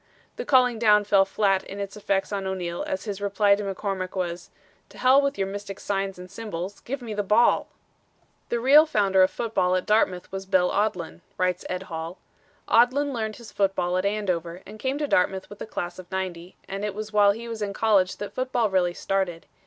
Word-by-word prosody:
The 485 - -5
calling 250 -4 +4
down 210 -2 +5
fell 200 -1 +4
flat 195 -1 +1
in 195 - -8
its 200 -1 -5
effects 195 -1 -1
on 195 -1 -2
O'Neal 175 -2 -3
as 190 - -3
his 205 -2 -5
reply 205 0 +3
to 200 - 0
McCormick 195 -1 -3
was, 175 -1 -3 0.4
'To - - -16
Hell 260 +2 +5
with 280 -4 -1
your 195 - 0
mystic 200 0 -6
signs 195 -1 -2
and 180 0 -9
symbols 195 -3 -6
give 265 +1 -6
me 225 -2 -5
the 205 - -1
ball!'" 210 +4 +3 0.8
"The 235 - 0
real 290 +6 +7
founder 195 -8 +3
of 185 - +5
football 190 -6 0
at 185 - -1
Dartmouth 195 -4 +1
was 195 0 -6
Bill 185 -2 +3
Odlin," 185 -5 -1 0.2
writes 185 0 0
Ed 185 +1 -3
Hall. 165 0 -6 0.5
"Odlin 265 +5 +3
learned 220 -3 -3
his 235 -2 -12
football 185 -3 0
at 185 - +1
Andover, 185 -4 -2
and 215 +2 -11
came 265 +4 -1
to 295 0 -1
Dartmouth 190 -3 +1
with 205 - -10
the - - -6
class 175 -4 -5
of 180 -1 -11
'90 185 -2 -4
and 195 +1 -5
it 210 -2 -3
was 215 0 -6
while 205 -1 +5
he 230 +3 -8
was 225 -2 -6
in 205 -1 -2
college 200 -3 +2
that 205 - -6
football 250 -4 0
really 180 -2 +1
started. 190 -3 -2
200 Hz, 205 wpm, -25 LUFS, 185-215 Hz, 0.8 s, real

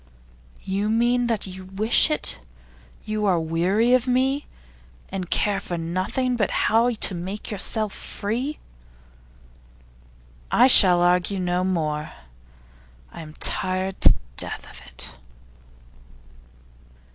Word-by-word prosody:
'You 200 +2 -2
mean 240 +2 +1
that 230 -3 -1
you 185 0 -9
wish 210 +9 +4
it. 305 - -1 0.7
You 215 -1 -2
are 180 -3 +2
weary 180 +9 +1
of 255 0 +2
me, 265 +3 0 0.6
and 185 -2 -5
care 205 -2 +1
for 175 - -5
nothing 185 +10 -2
but 210 -5 0
how 225 +3 +2
to 220 -4 -2
make 185 +6 -6
yourself 215 0 0
free.' 245 +9 -4 1.9
'I - - +5
shall 185 -9 +7
argue 180 +2 +1
no 180 0 -1
more. 155 -5 -2 1.0
I - - -10
am 155 -1 -12
tired 185 +1 -1
to - - +6 0.2
death - - +1
of 60 - -11
it. 60 -2 -4
195 Hz, 115 wpm, -23 LUFS, 180-230 Hz, 1.9 s, shall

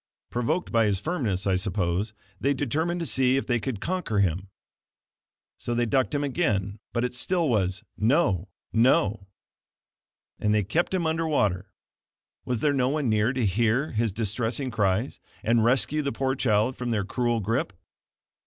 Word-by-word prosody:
Provoked 150 +9 -1
by 115 -2 +3
his 100 -2 +1
firmness, 115 - -2
I 95 -2 +2
suppose, 95 +1 -1 0.3
they 140 +1 +1
determined 160 +6 -1
to - - -2
see 130 -3 +2
if 135 - -1
they 120 -1 +1
could 115 -3 -4
conquer 180 - -2
him. 95 0 +1 1.1
So 120 - -3
they 120 0 +2
ducked 130 +2 +1
him 145 - 0
again 105 - -1
but 120 - -1
it 125 - -1
still 170 +6 0
was, 95 -7 0
"No, 105 - +2 0.3
no"; 110 -4 +3 1.1
and 105 0 +2
they 105 - +2
kept 165 - 0
him 175 -3 0
under 160 +1 0
water. 100 - 0 0.7
Was 125 -3 -2
there 145 -1 +3
no 130 -2 +2
one 145 -3 0
near 110 +2 +2
to 130 -3 -1
hear 115 - +1
his 115 -1 0
distressing 115 +5 -1
cries, 105 +2 0 0.2
and 115 +1 +3
rescue 130 +5 +2
the 140 -1 -2
poor 135 -1 -1
child 115 -1 +1
from 125 -1 -3
their 105 -4 0
cruel 120 +2 0
grip? 110 +1 -1
120 Hz, 165 wpm, -26 LUFS, 105-135 Hz, 1.1 s, by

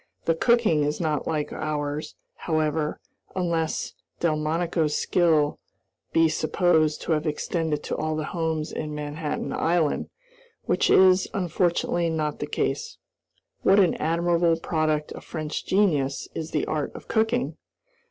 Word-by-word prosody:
The 165 - +3
cooking 215 -4 +3
is 150 +1 -1
not 155 -3 -1
like 155 -2 -2
ours, 150 -1 -3 0.2
however, 155 -1 -1 0.4
unless 170 -3 -1 0.3
Delmonico's 160 0 0
skill 160 -5 +2 0.5
be 165 0 +4
supposed 155 0 +2
to - - -3
have 155 0 +1
extended 155 0 -1
to - - -3
all 155 0 -1
the 155 - -2
homes 160 -2 -1
in 150 -1 -4
Manhattan 150 +1 -3
Island, 165 -3 +1 0.5
which - - +1
is, 185 0 +6
unfortunately, 175 -1 +1
not 155 -2 -2
the - - -3
case. 470 0 -2 0.6
What 195 +2 +5
an 185 -4 +4
admirable 170 +1 +2
product 155 -2 0
of - - -8
French 155 -2 -5
genius 150 -9 +1
is 160 0 -4
the 150 - -1
art 150 -2 -2
of - - -10
cooking! 225 +2 0
160 Hz, 135 wpm, -25 LUFS, 150-175 Hz, 0.6 s, is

